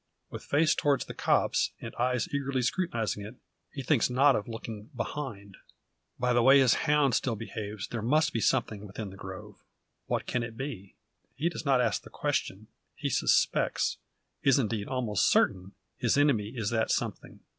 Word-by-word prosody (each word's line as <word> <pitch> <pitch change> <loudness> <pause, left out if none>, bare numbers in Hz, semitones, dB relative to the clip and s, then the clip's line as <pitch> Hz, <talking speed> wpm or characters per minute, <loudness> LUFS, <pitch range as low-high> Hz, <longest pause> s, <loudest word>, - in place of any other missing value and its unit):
With - - -7
face 155 +1 +3
towards 140 -2 +1
the - - -7
copse, - - +1
and - - -7
eyes 125 +4 0
eagerly 135 -2 -1
scrutinising 120 - -1
it, 105 +5 -9 0.4
he 135 - -6
thinks 130 -2 +2
not 135 +3 +4
of 105 - -2
looking 115 -2 -7
behind. 110 -7 -5 0.6
By 125 0 +1
the 120 - +4
way 135 +3 +7
his 130 -3 +5 0.2
hound 145 -3 +4
still 120 -4 0
behaves, 105 -2 -6
there 120 - -4
must 150 +7 +2
be 115 - -1
something 105 -5 0
within 100 0 -7
the - - -11
grove. 95 -1 -10 0.4
What - - -1
can 125 - -1
it 115 -1 -6
be? 125 -8 -6 0.4
He 160 +5 0
does 170 - -7
not 130 -2 +4
ask 120 - 0
the - - -13
question. - - -2 0.3
He - - -3
suspects - - +2 0.4
is, 135 -2 +4
indeed, 110 -5 -1
almost 120 -6 +1
certain 95 +2 +2 0.2
his 120 +2 +1
enemy 140 -8 +3
is 110 -3 -2
that 110 -1 +1
something. - - -3
120 Hz, 175 wpm, -29 LUFS, 105-135 Hz, 0.6 s, way